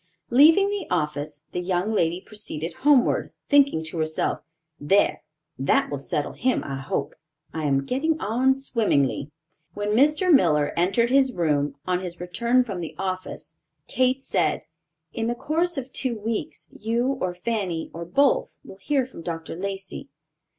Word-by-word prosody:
Leaving 320 +10 +6
the 405 -4 -3
office, 150 0 -2
the 180 - -2
young 180 +4 -1
lady 170 -3 +1
proceeded 180 -6 -6
homeward, 280 -3 +3 0.2
thinking 280 - +4
to 160 +1 -5
herself, 155 0 -1 0.4
"There, 195 +8 +2 0.4
that 140 +1 +2
will 145 - -3
settle 145 +1 -2
him, 255 +1 0
I 135 -1 -4
hope. 140 +2 -3 0.4
I 160 -1 -3
am 135 -1 +1
getting 310 - 0
on 255 +4 +2
swimmingly." 210 - 0 0.5
When 205 0 -2
Mr. 300 - +4
Miller 150 - +3
entered 195 +8 +2
his 265 -2 +4
room, 145 -4 0
on 180 -1 0
his 180 -2 -7
return 235 +8 +1
from 200 -7 -5
the 165 - -6
office, 185 0 -5 0.3
Kate 260 +1 +1
said, - - 0 0.5
"In 225 0 -2
the 240 - -1
course 330 +5 -1
of 265 -1 -5
two 250 -4 -1
weeks, 220 +1 -4
you 240 +5 -1
or 180 -1 -1
Fanny 180 -4 -3
or 170 - -6
both, 265 +12 +2
will 190 - -12
hear 265 +7 0
from 255 -9 -11
Dr. 165 -1 -5
Lacey." 195 -3 -6
195 Hz, 155 wpm, -24 LUFS, 165-255 Hz, 0.5 s, Leaving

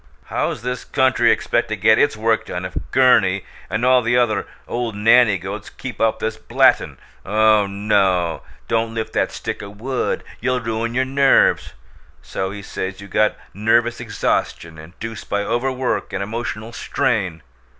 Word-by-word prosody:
How's - - -1
this 125 0 -3
country 130 -1 +3
expect - - 0
to - - -1
get 110 +1 +4
its 145 -6 +2
Work 110 0 +1
done 90 +1 -4
if 90 - -7
Gurney 100 -7 +3 0.2
and 110 +6 -1
all 130 0 +5
the 120 +1 +1
other 115 -4 +1 0.2
old 120 -3 -3
nanny 110 0 +5
goats 100 +3 -7
keep 130 -3 -8
up 110 -1 +2
this 110 0 -3
blattin' - - +2 0.3
'Oh, 110 0 +3
oh! 100 -4 +1 0.3
Don't 115 0 -1
lift 110 -1 -4
that - - 0
stick - - -5
o' 100 - -8
wood; 120 +6 -3 0.2
you'll 125 +1 0
ruin 115 0 -3
your 130 +1 +2
NERVES!' 135 +1 +3 0.5
So 95 - -3
he 100 0 -8
says 95 -1 -5
you 100 - -10
got 105 +2 +1 0.2
'nervous 115 +4 +2
exhaustion 85 -7 -2
induced 100 +8 -9
by 100 0 0
overwork 130 +3 -1
and 95 +1 -2
emotional 115 +1 -5
strain.' 95 -10 -1
110 Hz, 160 wpm, -20 LUFS, 100-120 Hz, 0.5 s, all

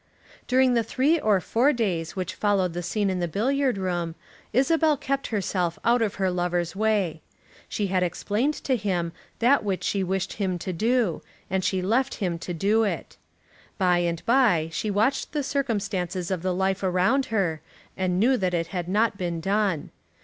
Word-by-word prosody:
During 255 0 +4
the 235 - +3
three 270 +8 +1
or 210 -8 +3
four 240 +9 +2
days 185 - -1
which 185 -1 -3
followed 195 -4 +1
the 175 - -3
scene 195 +3 0
in 185 - -2
the 175 - 0
billiard 255 - 0
room 175 -3 -2 0.4
Isabel 305 +4 +3
kept 275 +1 -2
herself 185 -5 -1
out 235 +1 +4
of 215 -3 0
her 190 -1 0
lover's 175 -1 -1
way. 200 -7 0 0.5
She 210 - -1
had 185 -1 +1
explained 210 - 0
to 265 - +1
him 185 -6 -1 0.3
that 250 +2 +3
which 195 -3 -2
she 195 -2 0
wished 190 0 -2
him 190 -3 -1
to 185 +2 -4
do, 225 -1 +1 0.3
and 190 0 0
she 185 0 0
left 240 +7 +1
him 175 -4 -2
to 175 - -6
do 205 +6 +2
it. 210 - -3 0.6
Day 175 -2 +3
by 235 -10 +4
day - - -8
she 215 - -2
watched 220 +10 0
the 295 -2 0
circumstances 200 - -2
of 185 -3 -1
the 185 +1 0
life 190 +1 0
around 190 +9 +2
her, 180 -8 0 0.3
and 185 -1 0
knew 255 +5 +4
that 185 -4 0
it 165 -1 -1
had 175 -1 -3
not 210 +1 +1
been 170 -2 -2
done. 195 -2 0
195 Hz, 180 wpm, -25 LUFS, 180-230 Hz, 0.6 s, During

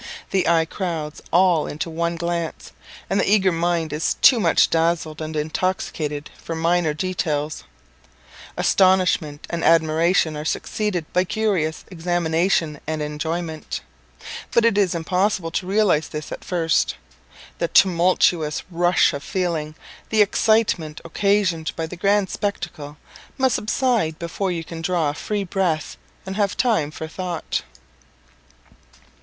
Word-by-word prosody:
The 190 -2 +1
eye 165 -1 +4
crowds 165 -4 -4
all 175 -3 +4
into 150 - -3
the 165 - -8
one 170 +1 0
glance, 170 -1 -3 0.4
and 195 - 0
the - - +1
eager 195 -3 +4
mind 165 -1 0
is 150 +2 0
too 250 - +6
much - - +3
dazzled 165 -1 0
and 155 0 -5
intoxicated 155 -2 -2
for 165 - -5
minor 165 0 +1
details. 155 -4 -2 0.9
Astonishment 185 -6 +2
and 170 -1 -2
admiration 165 0 +3
are 150 - -4
succeeded 180 +1 -2
by 180 - +3
curious 185 -6 -1
examination 170 -2 0
and 155 0 -2
enjoyment; 160 +2 -4 0.7
but 235 - +3
it 230 -3 +3
is 195 -4 +2
impossible 180 +1 0
to 180 - -2
realize 195 -6 +2
this 150 -1 -7
at - - -7
first. 165 -3 +1 0.6
The 170 - +1
tumultuous 175 -4 +3
rush 175 0 +3
of 140 - -4
feeling, 160 -3 -2 0.3
the 215 -1 +5
excitement 200 -7 +1
occasioned 185 -2 0
by 165 - -2
the 160 - -8
grand 200 +1 +1
spectacle, 155 -8 -4 0.4
must 260 -1 +2
subside 220 -8 0
before 170 +3 -3
you 170 -2 -3
can 165 0 -8
draw 165 -3 +1
a - - -8
free 205 +6 -3
breath, 175 -5 -1 0.3
and 190 +1 -5
have 200 -2 0
time 220 - +2
for 160 +1 -7
thought. 175 0 -3
170 Hz, 135 wpm, -22 LUFS, 160-190 Hz, 0.9 s, too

